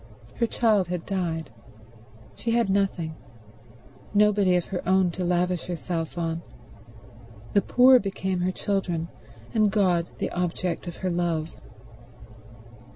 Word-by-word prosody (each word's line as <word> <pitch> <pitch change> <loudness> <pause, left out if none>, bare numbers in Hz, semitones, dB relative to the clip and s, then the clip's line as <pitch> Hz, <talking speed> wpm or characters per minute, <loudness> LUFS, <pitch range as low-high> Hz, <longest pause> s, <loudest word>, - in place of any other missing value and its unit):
Her 235 - +2
child 215 -6 +2
had 175 -1 -4
died; 165 - -2 0.8
she 235 - -4
had 230 -3 +2
nothing, 190 -5 0 1.0
nobody 205 -3 +4
of 175 - +1
her 180 - -4
own 190 -1 +4
to 180 +2 -4
lavish 180 0 0
herself 170 -1 -4
on. 165 -1 -2 1.1
The 200 - +5
poor 255 +3 +6
became 190 -2 -2
her 180 +1 +1
children, 180 -4 -2 0.4
and 215 -2 +3
God 180 -5 +2
the - - -2
object 180 0 -2
of 170 - -6
her 185 - +1
love. 170 -2 -1
180 Hz, 125 wpm, -26 LUFS, 170-200 Hz, 1.1 s, poor